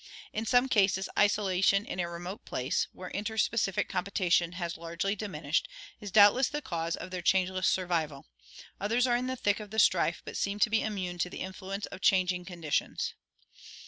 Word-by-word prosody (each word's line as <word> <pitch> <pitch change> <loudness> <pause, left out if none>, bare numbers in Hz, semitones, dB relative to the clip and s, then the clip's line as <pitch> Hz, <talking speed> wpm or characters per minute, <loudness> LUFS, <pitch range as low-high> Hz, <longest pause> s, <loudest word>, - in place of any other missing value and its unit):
In 220 +1 -3
some 245 +3 +4
cases 195 -5 +2
isolation 195 -1 +3
in 185 - -5
a 170 -1 -1
remote 175 +3 -7
place, 130 +3 -1
where 185 - -9
inter 220 +2 -4
specific 205 -4 +1
competition 180 -2 +1
has 175 -2 -4
largely 170 +5 -2
diminished, 210 -1 -2 0.3
is 205 - -7
doubtless 215 +6 +6
the 295 - -3
cause 170 - -3
of 185 - -8
their 180 -1 -4
changeless 185 +1 +2
survival; 165 -6 -1 0.5
others 230 +5 +1
are 245 -1 +2
in 250 +1 -1
the 260 - -2
thick 205 -4 0
of 210 -1 -8
the 220 - -7
strife 220 - +3
but - - -6
seem 200 +1 -1
to 215 +1 +2
be 225 - +3
immune 185 -5 -3
to 180 - 0
the - - -7
influence 190 +2 -5
of 195 - -10
changing 180 -1 +2
condi 170 -5 -8
tions. - - 0
190 Hz, 185 wpm, -30 LUFS, 180-210 Hz, 0.5 s, doubtless